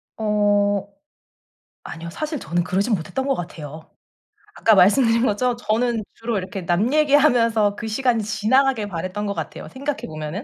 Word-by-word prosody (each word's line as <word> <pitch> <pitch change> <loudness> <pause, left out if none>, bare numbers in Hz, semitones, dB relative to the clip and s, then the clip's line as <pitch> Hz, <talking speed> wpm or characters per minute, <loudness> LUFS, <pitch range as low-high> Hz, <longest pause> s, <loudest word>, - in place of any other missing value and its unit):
어 205 -2 +1 1.0
아니요. 165 +1 -8
사실 305 - -4
저는 175 -1 -1
그러지는 200 +5 0
못했던 265 +11 -4
것 275 - +2
같아요, 155 -3 -8 0.7
아까 220 - +4
말씀드린 230 +4 +4
것처럼 245 +3 +1
저는 235 0 0
주로 230 -1 -3
이렇게 190 0 -5
남 180 +8 +1
얘기하면서 245 -9 +3
그 225 +2 -6
시간이 230 0 0
지나가길 230 +2 +1
바랐던 185 +3 -4
것 200 - -2
같아요, - - -6
생각해 280 +2 -4
보면은. 155 +6 -6
215 Hz, 355 characters per minute, -22 LUFS, 190-245 Hz, 1.0 s, 아까